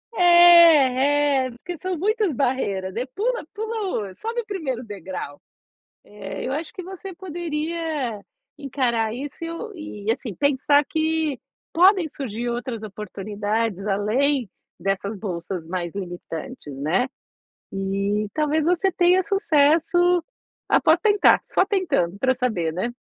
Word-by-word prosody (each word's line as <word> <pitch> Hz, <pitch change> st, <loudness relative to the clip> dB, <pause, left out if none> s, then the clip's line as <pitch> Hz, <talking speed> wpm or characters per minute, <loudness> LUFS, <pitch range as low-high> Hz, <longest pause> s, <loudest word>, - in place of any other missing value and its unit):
é 290 Hz, -6 st, +6 dB
é -, -, -8 dB
porque 330 Hz, +9 st, -8 dB
são 370 Hz, +2 st, -3 dB
muitas 420 Hz, 0 st, +1 dB
barreiras, 205 Hz, -8 st, -1 dB
né, 235 Hz, +5 st, -2 dB
pula 485 Hz, +5 st, -1 dB
pula 420 Hz, -, -3 dB
o 185 Hz, -, -16 dB
sobe 460 Hz, +2 st, -3 dB
o -, -, -16 dB
1º 305 Hz, -, -4 dB
degrau, 190 Hz, -, -7 dB, 0.7 s
eh, 200 Hz, -2 st, -7 dB
eu 260 Hz, -, -2 dB
acho 315 Hz, +2 st, -4 dB
que 370 Hz, -, -7 dB
você 380 Hz, +1 st, -8 dB
poderia, 320 Hz, -, -3 dB, 0.4 s
encarar 245 Hz, -6 st, -1 dB
isso, 280 Hz, +6 st, -7 dB, 0.3 s
e 310 Hz, -, -8 dB
e, 220 Hz, -, +2 dB
assim, 230 Hz, -4 st, -4 dB
pensar 285 Hz, -, +3 dB
que 315 Hz, -3 st, -1 dB, 0.3 s
podem 365 Hz, 0 st, +5 dB
surgir 240 Hz, -3 st, -4 dB
outras 235 Hz, -1 st, -4 dB
oportunidades 210 Hz, 0 st, -3 dB
além 230 Hz, +5 st, +1 dB, 0.3 s
dessas 195 Hz, +3 st, -2 dB
bolsas 180 Hz, -3 st, -5 dB
mais 175 Hz, -1 st, -4 dB
limitantes, 175 Hz, -, -7 dB
né. 165 Hz, -, +1 dB, 0.7 s
E 195 Hz, +2 st, -1 dB
talvez 305 Hz, 0 st, +1 dB
você 360 Hz, +2 st, +2 dB
tenha 360 Hz, +1 st, +4 dB
sucesso, 345 Hz, 0 st, +3 dB, 0.5 s
após 320 Hz, +2 st, +4 dB
tentar, 415 Hz, +1 st, +4 dB
só -, -, +2 dB
tentando 290 Hz, -, 0 dB
pra 260 Hz, +3 st, +2 dB
saber, 215 Hz, -11 st, -1 dB
né. 210 Hz, +8 st, -3 dB
270 Hz, 125 wpm, -23 LUFS, 205-340 Hz, 0.7 s, é